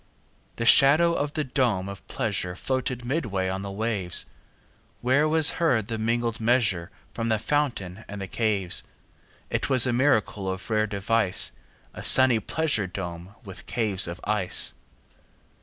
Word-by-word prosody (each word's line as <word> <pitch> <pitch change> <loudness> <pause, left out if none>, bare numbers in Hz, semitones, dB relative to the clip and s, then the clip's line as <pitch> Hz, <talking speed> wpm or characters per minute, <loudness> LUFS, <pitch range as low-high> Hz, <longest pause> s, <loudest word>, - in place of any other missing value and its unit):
30 - - -37
The 115 - -3
shadow 150 +8 +6
of 145 -2 -3
the 155 - -2
dome 125 -8 -1
of 100 -1 -10
pleasure 100 -7 -3
Floated 130 +2 -3
midway 110 - -2
on 95 +1 -4
the 100 - -6
waves; 100 -3 -1 0.8
Where 140 +5 +2
was 160 -1 +5
heard 120 -10 +1
the 115 -1 -4
mingled 115 +1 -1
measure 110 -7 0 0.2
From 115 0 -3
the 110 - +1
fountain 110 -7 -3
and 100 0 -8
the 95 - -5
caves. 100 -3 0 0.7
It - - -2
was 130 -3 +5
a 125 - 0
miracle 110 -7 0
of 95 0 -5
rare 110 0 +1
device, 100 0 +1 0.4
35 - - -10
A - - -7
sunny 130 -3 +6
pleasure 125 -3 -1
dome 90 +1 -8
with 95 -3 -11
caves 105 -6 +2
of 85 +1 -7
ice! 105 -3 +2
110 Hz, 155 wpm, -25 LUFS, 95-130 Hz, 0.8 s, shadow